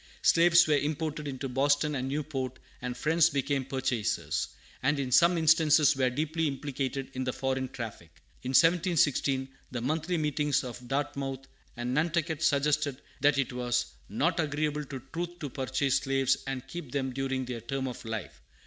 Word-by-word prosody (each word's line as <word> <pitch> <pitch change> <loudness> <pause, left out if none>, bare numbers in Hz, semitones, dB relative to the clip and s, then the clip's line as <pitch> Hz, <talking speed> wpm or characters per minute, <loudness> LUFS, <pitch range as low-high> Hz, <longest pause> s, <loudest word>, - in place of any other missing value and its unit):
Slaves 175 +1 +6
were 150 -2 +4
imported 150 0 -2
into 135 -1 -4
Boston 145 +3 +2
and 130 -2 -2
Newport, 135 -3 -3 0.2
and 125 0 -4
Friends 160 +4 +4
became 140 -2 -1
purchasers, 130 -4 -1 0.3
and 145 +2 +1
in 130 -2 -2
some 170 +6 +5
instances 155 -2 +5
were 130 -1 +2
deeply 155 +4 -1
implicated 135 -1 -3
in 130 - -2
the 130 - -1
foreign 130 0 -2
traffic. 110 -9 -7 0.3
In 130 - -5
1716, 155 -4 +3 0.2
the 120 -2 -4
monthly 155 +7 -1
meetings 150 -2 +1
of 125 -1 -8
Dartmouth 135 -1 -3 0.3
and 120 +1 -2
Nantucket 160 +1 0
suggested 145 -2 +2 0.2
that 145 0 +4
it 135 -2 0
was 120 - -1 0.2
"not - - 0
agreeable 150 -1 -1
to 135 -3 -7
truth 175 +1 -4
to 145 -6 -6
purchase 130 +1 0
slaves 135 -1 +2
and 135 -1 -4
keep 150 -2 -7
them 135 -2 -1
during 135 0 -2
their 120 -2 -5
term 135 +3 -3
of 125 - -7
life." 110 -4 -6
140 Hz, 160 wpm, -29 LUFS, 130-150 Hz, 0.3 s, Slaves